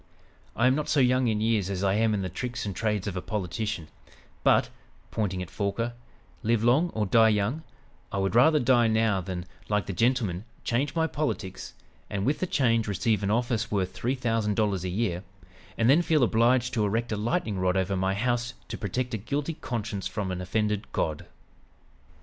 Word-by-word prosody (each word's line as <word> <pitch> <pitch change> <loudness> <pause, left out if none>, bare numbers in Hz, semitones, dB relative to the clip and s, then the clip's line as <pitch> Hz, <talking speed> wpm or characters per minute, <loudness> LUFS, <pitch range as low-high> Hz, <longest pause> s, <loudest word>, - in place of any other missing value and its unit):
I 115 - +2
am 130 - +5
not 150 +2 -2
so 145 - +3
young 130 -1 +3
in 110 -2 0
years 110 -4 +1
as 95 -1 -2
I 95 -1 +3
am 110 +1 +2
in 100 - -2
the - - -1
tricks 120 +8 -4
and 100 -2 -4
trades 105 -2 -1
of 100 -3 -3
a 90 - -2
politician, 105 -3 -3 0.6
but" - - +4 0.4
pointing 95 -4 -1
at 90 - -11
Forquer 115 +4 -2 0.5
"live 115 -1 +1
long 135 +9 +4
or 110 -1 +1
die 110 +3 +5
young, 110 +8 0 0.5
I 100 - -2
would 95 0 0
rather 150 +6 +5
die 120 -2 +4
now 110 -3 +2
than, 90 -1 -5 0.2
like 105 -3 +1
the 95 - -4
gentleman, 115 -4 +1 0.2
change 130 +7 0
my 160 -1 +2
politics, 150 - -3 0.3
and 100 -1 -2
with 145 +4 +1
the 185 - -1
change 115 -8 +2
receive 105 +2 +1
an 100 - -1
office 115 0 0
worth 95 -3 0
three 125 +3 -1
thousand 115 -4 0
dollars 100 -4 0
a 90 - -2
year, 90 -2 -1 0.6
and 115 - +2
then 145 +7 +6
feel 160 -5 +2
obliged 120 +2 +3
to 110 -3 +1
erect 115 +3 0
a - - +1
lightning 110 - -1
rod 90 0 +1
over 95 +1 0
my 95 +1 0
house 120 +2 -1
to - - -5
protect 125 +5 -2
a 110 - -1
guilty 140 +9 -2
conscience 115 -8 -4
from 100 -3 -3
an 90 0 -3
offended 105 +2 -1
God!" 75 -2 -2
110 Hz, 195 wpm, -27 LUFS, 100-120 Hz, 0.6 s, then